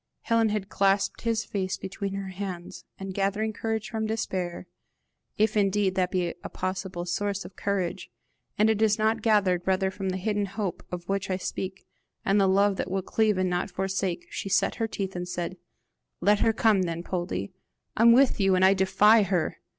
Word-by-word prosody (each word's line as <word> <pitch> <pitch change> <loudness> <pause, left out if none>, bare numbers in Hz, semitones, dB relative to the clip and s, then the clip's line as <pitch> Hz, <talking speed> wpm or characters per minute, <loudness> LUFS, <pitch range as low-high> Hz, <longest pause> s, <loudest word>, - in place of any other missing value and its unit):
Helen 230 -1 +2
clasped 195 0 +1
his 225 -1 0
face 190 -2 -2
between 195 +1 -5
her 195 -1 -4
hands, 185 -2 -6
and 195 -1 -6
gathering 205 +3 0
courage 220 +1 -2
from 220 -2 -2
despair, 185 -6 -3 0.7
if 215 0 +2
indeed 200 -1 +2
that 185 -1 +1
be 180 -2 -1
a - - -5
possible 185 -1 -4
source 200 +3 -2
of 185 - -11
courage, 190 -2 -2 0.5
and 215 - +4
it 220 -1 +1
is 215 -1 +4
not 220 +1 +1
gathered 200 -5 +3
rather 190 0 +2
from 195 0 -4
the 185 - -2
hidden 205 +1 -1
hope 195 -1 -4
of 175 -1 -6
which 195 -1 -1
I 185 - 0
speak, 190 0 -5 0.4
and 200 +1 +3
the 195 - +4
love 200 +1 +3
that - - -3
will 190 0 -1
cleave 215 0 +1
and 185 -1 +1
not 180 +3 -1
forsake, 190 -1 -2
she 195 - -4
set 195 - +2
her 225 - +2
teeth, 195 -3 -4
and 180 0 -4
said: 175 0 -3 0.6
"Let 205 +3 +3
her 225 - +4
come 220 -3 +3
then, 170 -1 -2
Poldie! 175 - -3 0.4
I - - 0
am 235 0 +8
with 260 +1 +5
you, 195 -1 +4
and 185 +1 +4
I 190 - +6
defy 210 +3 +5
her! 185 -5 -1
195 Hz, 190 wpm, -27 LUFS, 185-210 Hz, 0.7 s, am